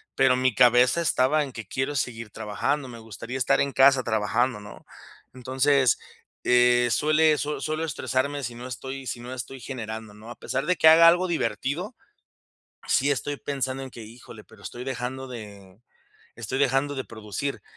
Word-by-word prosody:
pero 130 Hz, -1 st, +4 dB
mi 130 Hz, -3 st, +1 dB
cabeza 125 Hz, +5 st, +5 dB
estaba 150 Hz, -2 st, +2 dB
en 135 Hz, -, -7 dB
que: 115 Hz, -4 st, -9 dB
"Quiero 135 Hz, +6 st, -2 dB
seguir 115 Hz, -4 st, -3 dB
trabajando, 110 Hz, +7 st, -2 dB
me 120 Hz, -2 st, -10 dB
gustaría 115 Hz, +3 st, -7 dB
estar 130 Hz, -, +2 dB
en 140 Hz, -1 st, 0 dB
casa 135 Hz, -1 st, +5 dB
trabajando", 110 Hz, +1 st, 0 dB
¿no?, 105 Hz, -, -12 dB, 0.5 s
entonces, 130 Hz, 0 st, +2 dB, 0.5 s
eh, 125 Hz, 0 st, +4 dB
suele 155 Hz, +2 st, +3 dB
sue 150 Hz, +1 st, -3 dB
suelo 155 Hz, +1 st, -2 dB
estresarme 140 Hz, -1 st, -2 dB
sino 120 Hz, +1 st, -6 dB
estoy 130 Hz, +2 st, -7 dB
sino 120 Hz, +1 st, -6 dB
estoy 130 Hz, +2 st, -7 dB
generando, 110 Hz, -4 st, -7 dB
¿no?, 110 Hz, +2 st, -13 dB
a -, -, -8 dB
pesar 135 Hz, -, -3 dB
de 180 Hz, -1 st, +1 dB
que 160 Hz, -, +5 dB
haga 165 Hz, +1 st, +9 dB
algo 180 Hz, +2 st, +2 dB
divertido, 170 Hz, -, -2 dB, 1.0 s
sí 140 Hz, +2 st, +3 dB
estoy 145 Hz, +1 st, -3 dB
pensando 135 Hz, -2 st, -3 dB
en 130 Hz, -, -9 dB
que: 115 Hz, -, -10 dB
"Híjole, 110 Hz, -1 st, -12 dB
pero 105 Hz, -2 st, -19 dB
estoy 120 Hz, -, -7 dB
dejando 130 Hz, 0 st, -5 dB
de 100 Hz, -4 st, -11 dB, 0.6 s
estoy 120 Hz, +4 st, -4 dB
dejando 140 Hz, +1 st, +1 dB
de 130 Hz, -, -3 dB
producir". 110 Hz, +5 st, -5 dB
130 Hz, 165 wpm, -25 LUFS, 115-140 Hz, 1.0 s, haga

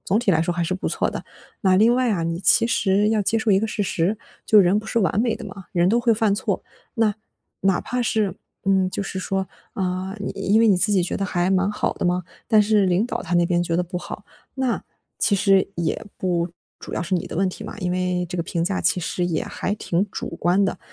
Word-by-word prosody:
总 200 Hz, +3 st, +2 dB
体 235 Hz, -4 st, +1 dB
来 160 Hz, -2 st, +3 dB
说 170 Hz, +2 st, 0 dB
还 175 Hz, -, 0 dB
是 175 Hz, -, -2 dB
不 185 Hz, -, -3 dB
错 -, -, 0 dB
的。 -, -, -5 dB, 0.4 s
那 190 Hz, -2 st, +4 dB
另 225 Hz, +5 st, +5 dB
外 255 Hz, -2 st, +2 dB
啊 175 Hz, -5 st, 0 dB
你 165 Hz, +2 st, -2 dB
其 215 Hz, +4 st, +5 dB
实 205 Hz, -2 st, +2 dB
要 220 Hz, -, +2 dB
接 220 Hz, +3 st, +1 dB
受 220 Hz, -1 st, 0 dB
一 190 Hz, -, +5 dB
个 220 Hz, -, 0 dB
事 215 Hz, -, -2 dB
实， 190 Hz, +2 st, 0 dB, 0.3 s
就 215 Hz, -, +6 dB
人 195 Hz, +1 st, +5 dB
不 215 Hz, -, -7 dB
是 230 Hz, -, 0 dB
完 190 Hz, 0 st, +1 dB
美 230 Hz, -2 st, +1 dB
的 230 Hz, -, -9 dB
嘛， 195 Hz, -2 st, -10 dB
人 175 Hz, -1 st, +2 dB
都 235 Hz, -, +3 dB
会 235 Hz, -1 st, +3 dB
犯 210 Hz, -2 st, +2 dB
错， -, -, -2 dB, 0.3 s
那， 225 Hz, -4 st, +2 dB, 0.5 s
哪 195 Hz, -1 st, +2 dB
怕 250 Hz, 0 st, -2 dB
是， 215 Hz, -4 st, 0 dB, 0.3 s
嗯， 190 Hz, -1 st, +3 dB
就 200 Hz, -, -3 dB
是 190 Hz, -1 st, -5 dB
说， 190 Hz, +1 st, -2 dB, 0.3 s
啊， 185 Hz, -2 st, -3 dB
你 200 Hz, -, -3 dB
因 215 Hz, +3 st, +2 dB
为 225 Hz, -, +5 dB
你 195 Hz, -, +5 dB
自 210 Hz, +4 st, +3 dB
己 190 Hz, -, +3 dB
觉 175 Hz, -, -2 dB
得 195 Hz, -, -2 dB
还 180 Hz, -1 st, 0 dB
蛮 195 Hz, +1 st, +2 dB
好 210 Hz, -, -1 dB
的 -, -, -4 dB
嘛， 180 Hz, +1 st, +1 dB, 0.2 s
但 215 Hz, -2 st, +5 dB
是 210 Hz, -1 st, +3 dB
领 185 Hz, +6 st, +2 dB
导 -, -, -3 dB
他 175 Hz, -, -3 dB
那 175 Hz, 0 st, +4 dB
边 175 Hz, 0 st, +1 dB
觉 165 Hz, -1 st, -2 dB
得 180 Hz, -, +2 dB
不 180 Hz, +1 st, -6 dB
好， 180 Hz, -, -7 dB, 0.3 s
那 260 Hz, -3 st, -1 dB, 0.4 s
其 205 Hz, -, +3 dB
实 195 Hz, 0 st, +3 dB
也 170 Hz, +6 st, -2 dB
不 175 Hz, -2 st, 0 dB, 0.3 s
主 -, -, -9 dB
要 -, -, -2 dB
是 185 Hz, +3 st, -1 dB
你 175 Hz, -, -1 dB
的 -, -, -7 dB
问 190 Hz, 0 st, +2 dB
题 215 Hz, -, -8 dB
嘛， 215 Hz, -, -8 dB
因 180 Hz, -2 st, -2 dB
为 180 Hz, 0 st, -1 dB
这 180 Hz, -, -5 dB
个 170 Hz, -, 0 dB
评 170 Hz, 0 st, -2 dB
价 185 Hz, +2 st, -1 dB
其 180 Hz, +1 st, +2 dB
实 175 Hz, +1 st, -2 dB
也 170 Hz, -3 st, -1 dB
还 205 Hz, -, -3 dB
挺 190 Hz, -1 st, -1 dB
主 -, -, -5 dB
观 180 Hz, +3 st, +2 dB
的。 185 Hz, -1 st, -1 dB
195 Hz, 275 characters per minute, -22 LUFS, 180-215 Hz, 0.5 s, 就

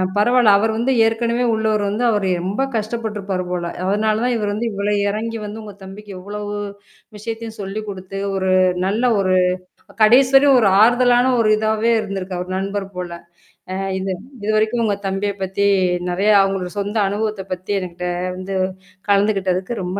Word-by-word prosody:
பரவால்ல, 225 Hz, 0 st, +4 dB
அவரு 220 Hz, +2 st, +1 dB
வந்து 255 Hz, +3 st, +1 dB
ஏற்கனவே 235 Hz, +2 st, 0 dB
உள்ளவரு 215 Hz, -1 st, 0 dB
வந்து, 215 Hz, +4 st, -2 dB
அவரு 200 Hz, -3 st, 0 dB, 0.2 s
ரொம்ப 200 Hz, +7 st, -2 dB
கஷ்டப்பருப்பாரு 210 Hz, -4 st, -3 dB
போல. 175 Hz, -1 st, -2 dB, 0.2 s
அதனால 215 Hz, +3 st, +1 dB
தான் 250 Hz, -, +1 dB
இவரு 210 Hz, -1 st, -2 dB
வந்து 230 Hz, +3 st, -2 dB
இவ்வளோ 200 Hz, +1 st, -1 dB, 0.2 s
இறங்கி 225 Hz, +2 st, -3 dB
வந்து 215 Hz, +2 st, -7 dB
உங்க 205 Hz, -1 st, -9 dB
தம்பிக்கு 200 Hz, +2 st, -10 dB
இவ்வளவு 205 Hz, +2 st, -6 dB, 0.6 s
விஷயத்தையும் 225 Hz, +1 st, -6 dB
சொல்லி 195 Hz, +2 st, -4 dB
குடுத்து, 190 Hz, 0 st, -7 dB, 0.2 s
ஒரு 190 Hz, -1 st, -1 dB, 0.4 s
நல்ல 215 Hz, +5 st, -1 dB, 0.2 s
ஒரு 185 Hz, -1 st, +2 dB, 0.7 s
கடைசி 255 Hz, +5 st, +6 dB
வரையும் 275 Hz, -1 st, +6 dB
ஒரு 210 Hz, -, +4 dB
ஆறுதலான 245 Hz, +2 st, +4 dB
ஒரு 220 Hz, -, +3 dB
இதாவே 220 Hz, +1 st, +1 dB
இருந்திருக்கு, 195 Hz, -3 st, -5 dB
அவர் 180 Hz, +1 st, -4 dB
நண்பர் 195 Hz, 0 st, -3 dB
போல. 180 Hz, -1 st, -5 dB, 0.6 s
அ -, -, -3 dB, 0.2 s
இது 190 Hz, 0 st, -2 dB, 0.3 s
இதுவரைக்கும் 215 Hz, +2 st, +1 dB
உங்க 205 Hz, -2 st, +1 dB
தம்பிய 195 Hz, +1 st, -1 dB
பத்தி 190 Hz, +2 st, -1 dB, 0.4 s
நெறைய 195 Hz, +4 st, +2 dB
அவங்களோட 195 Hz, -2 st, -1 dB
சொந்த 205 Hz, +2 st, -2 dB
அனுபவத்த 210 Hz, 0 st, -2 dB
பத்தி 185 Hz, +2 st, -6 dB
எனகிட்ட 180 Hz, -1 st, -5 dB, 0.3 s
வந்து 190 Hz, +1 st, -5 dB, 0.5 s
கலந்துகிட்டதுக்கு 195 Hz, 0 st, +1 dB
ரொம்ப 180 Hz, +2 st, -3 dB
205 Hz, 155 wpm, -19 LUFS, 195-225 Hz, 0.7 s, கடைசி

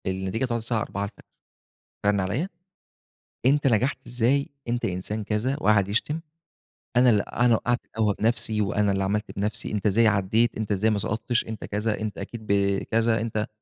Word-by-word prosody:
النتيجة 95 Hz, +6 st, -1 dB
طلعت 120 Hz, -2 st, -2 dB
الساعة 115 Hz, -1 st, 0 dB
04:00، 100 Hz, -2 st, -5 dB, 0.8 s
رن 100 Hz, 0 st, +3 dB
عليّا، 105 Hz, -, -1 dB, 1.0 s
أنت 140 Hz, +2 st, +4 dB
نجحت 125 Hz, +3 st, +2 dB
إزاي؟ 125 Hz, +4 st, +1 dB, 0.2 s
أنت 120 Hz, 0 st, -1 dB
إنسان 95 Hz, +4 st, -3 dB
كذا 110 Hz, +6 st, -1 dB
وقعد 105 Hz, -5 st, +4 dB
يشتم 115 Hz, +10 st, 0 dB, 0.8 s
أنا 125 Hz, 0 st, +6 dB
ال 105 Hz, -3 st, +3 dB
أنا 120 Hz, -, 0 dB
اللي 120 Hz, -, +5 dB
وقعت 120 Hz, +2 st, 0 dB
القهوة 105 Hz, -2 st, 0 dB
بنفسي 110 Hz, -1 st, +2 dB
وأنا 105 Hz, 0 st, +1 dB
اللي 95 Hz, 0 st, 0 dB
عملت 105 Hz, +1 st, -2 dB
بنفسي، 105 Hz, +2 st, -1 dB
أنت 105 Hz, 0 st, -2 dB
إزاي 110 Hz, +3 st, +4 dB
عديت، 105 Hz, +3 st, +2 dB
أنت 110 Hz, -1 st, -2 dB
إزاي 105 Hz, +3 st, +2 dB
ما 105 Hz, -, +1 dB
سقطتش، 115 Hz, +4 st, 0 dB
أنت 110 Hz, -2 st, -6 dB
كذا، 105 Hz, +1 st, -1 dB
أنت 110 Hz, -1 st, -4 dB
أكيد 110 Hz, +2 st, -7 dB
ب 100 Hz, -1 st, +2 dB
كذا، 115 Hz, 0 st, +1 dB
أنت 110 Hz, -1 st, -2 dB
110 Hz, 170 wpm, -25 LUFS, 100-120 Hz, 1.0 s, أنا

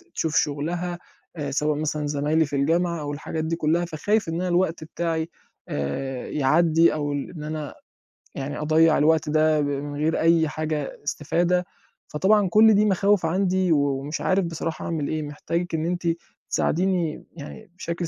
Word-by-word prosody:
تشوف 160 Hz, -2 st, -1 dB
شُغلها 170 Hz, +5 st, -1 dB, 0.4 s
آآ 145 Hz, -2 st, -3 dB
سواء 150 Hz, +1 st, 0 dB
مثلًا 150 Hz, -1 st, -2 dB
زمايلي 150 Hz, +2 st, +1 dB
في 145 Hz, -, -5 dB
الجامعة 170 Hz, +3 st, +1 dB
أو 145 Hz, 0 st, -4 dB
الحاجات 155 Hz, +2 st, -4 dB
دي 165 Hz, +1 st, -1 dB
كُلّها، 165 Hz, +2 st, +1 dB
فخايف 175 Hz, +4 st, 0 dB
إن 165 Hz, -, -2 dB
أنا 180 Hz, +2 st, -1 dB
الوقت 175 Hz, -2 st, +1 dB
بتاعي 165 Hz, 0 st, -2 dB, 0.4 s
آآ 125 Hz, -, -3 dB
يعدّي 160 Hz, +3 st, +3 dB
أو 145 Hz, -1 st, -2 dB
ال 140 Hz, -1 st, -3 dB
إن 155 Hz, -4 st, -8 dB
أنا 155 Hz, -1 st, -5 dB, 0.6 s
يعني 140 Hz, +2 st, -4 dB
أضيَّع 155 Hz, +1 st, +4 dB
الوقت 155 Hz, 0 st, +3 dB
ده 155 Hz, 0 st, +3 dB
ب -, -, 0 dB
من 145 Hz, +1 st, -3 dB
غير 160 Hz, +2 st, +1 dB
أي 165 Hz, -1 st, +4 dB
حاجة 155 Hz, -2 st, -3 dB
استفادة، 175 Hz, +5 st, 0 dB, 0.4 s
فطبعًا 195 Hz, +6 st, +3 dB
كل 220 Hz, +3 st, +6 dB
دي 210 Hz, +1 st, +4 dB
مخاوِف 200 Hz, -2 st, +2 dB
عندي 185 Hz, +1 st, +1 dB
و 155 Hz, -, +5 dB, 0.2 s
ومش 150 Hz, +3 st, -4 dB
عارِف 190 Hz, -1 st, +2 dB
بصراحة 165 Hz, -1 st, -4 dB
أعمل 155 Hz, -4 st, -2 dB
إيه، 155 Hz, -1 st, -2 dB
محتاجِك 165 Hz, +4 st, -3 dB
إن 160 Hz, 0 st, -1 dB
أنتِ 175 Hz, 0 st, -2 dB, 0.4 s
تساعديني 175 Hz, -2 st, 0 dB
يعني 175 Hz, +6 st, -10 dB
بشكل 170 Hz, -1 st, -3 dB
160 Hz, 165 wpm, -24 LUFS, 150-175 Hz, 0.6 s, كل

